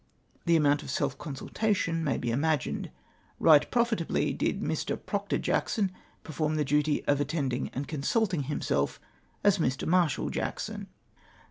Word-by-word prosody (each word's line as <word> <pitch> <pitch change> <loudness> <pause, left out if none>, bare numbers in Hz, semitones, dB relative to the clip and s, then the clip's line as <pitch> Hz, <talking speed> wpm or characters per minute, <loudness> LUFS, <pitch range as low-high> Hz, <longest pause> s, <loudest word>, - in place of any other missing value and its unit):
The 170 - +5
amount 145 -2 +3
of - - -9
self 140 -1 0
consultation 165 +3 -1
may 145 -4 0
be 120 - -2
imagined. 145 +3 0 0.6
Eight 150 -3 +7
profitably 235 -8 +1
did - - -1
Mi\ - - -1 0.3
Proctor - - -1
Jackson 200 -4 0 0.3
perform 155 0 -1
the 150 -1 +1
dut}^ 150 +1 +1
of 145 0 +3
attending 140 -4 -1
and 140 +3 -5
consulting 165 - 0
himself 70 - -1 0.4
as 205 -2 +4
Mr. 130 -3 0
Marshal 170 -4 +2
Jackson - - -4
150 Hz, 135 wpm, -29 LUFS, 140-170 Hz, 0.6 s, Eight